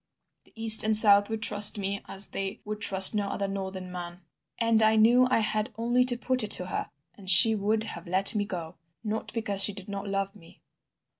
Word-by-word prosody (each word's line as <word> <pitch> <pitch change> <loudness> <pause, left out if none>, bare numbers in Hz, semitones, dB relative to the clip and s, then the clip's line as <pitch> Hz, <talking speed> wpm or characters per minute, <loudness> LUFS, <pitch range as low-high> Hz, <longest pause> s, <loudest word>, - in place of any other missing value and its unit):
The - - -24
east 225 -1 +6
and 215 0 +1
south 205 -1 +3
would 220 0 -6
trust 210 -1 +3
me 200 0 -5
as 195 +1 -2
they 195 0 -7
would 210 +1 -8
trust 190 +1 +3
no 205 -2 -3
other 200 0 -5
northern 190 -2 -8
man. 175 0 -9 0.4
And 230 -1 0
I 220 0 +2
knew 240 +4 +3
I 230 - 0
had 215 0 -3
only 240 +2 0
to 245 -1 +2
put 255 +1 -3
it 210 - -6
to 180 - -8
her 180 - -6 0.2
and 190 0 -10
she 220 +5 +8
would 215 +1 -3
have 220 - -9
let 190 +4 +4
me 210 -2 -2
go.... 175 -4 -9 0.3
Not 215 0 -6
because 205 -4 -2
she 205 - +2
did 195 0 -12
not 200 0 -7
love 195 0 -5
me! 170 -5 -21
205 Hz, 215 wpm, -25 LUFS, 195-220 Hz, 0.4 s, she